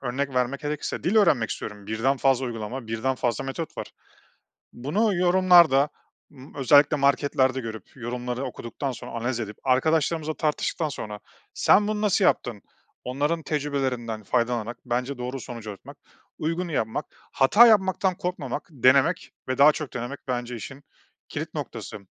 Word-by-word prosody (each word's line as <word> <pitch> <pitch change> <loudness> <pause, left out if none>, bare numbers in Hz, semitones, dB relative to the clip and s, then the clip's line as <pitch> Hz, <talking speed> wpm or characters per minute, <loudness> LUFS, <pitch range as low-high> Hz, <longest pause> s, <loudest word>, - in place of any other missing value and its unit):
Örnek 135 +2 -2
vermek 125 +3 0
gerekirse 150 -1 -4
dil 195 +6 +1
öğrenmek 140 - +4
istiyorum, 105 -1 -6
birden 125 +5 0
fazla 130 -1 +2
uygulama, 115 +1 -5
birden 115 +4 -1
fazla 125 +1 -1
metot 155 +4 -5
var. - - -4 0.9
Bunu 190 - 0
yorumlarda, 175 -5 +5 0.4
ımm, 135 0 -14
özellikle 145 +2 +5
marketlerde 140 -1 +2
görüp 110 -4 -7
yorumları 125 +1 -4
okuduktan 130 +2 -5
sonra 120 - -9
analiz 120 +1 -2
edip 105 -2 -5
arkadaşlarımızla 155 +4 +1
tartıştıktan 155 +1 -1
sonra, 105 -6 -6 0.3
"Sen 205 +1 +4
bunu 215 0 -1
nasıl 200 -2 +3
yaptın?" 115 -5 +1 0.4
Onların 145 +6 -1
tecrübelerinden 130 -7 -2
faydalanarak 120 0 -1
bence 125 +3 -2
doğru 125 +2 -4
sonuca 115 -4 -7
ulaşmak, 100 - -12 0.4
uygunu 165 +2 -2
yapmak, 110 -6 -1 0.3
hata 210 - +7
yapmaktan 190 -3 +3
korkmamak, 175 -9 -4
denemek 130 0 +3 0.2
ve 130 - -2
daha 145 +2 +8
çok 150 -2 -6
denemek 125 +3 -5
bence 120 -1 -3
işin 135 +5 -9 0.5
kilit - - -5
noktası. - - -6
135 Hz, 140 wpm, -25 LUFS, 120-155 Hz, 0.9 s, daha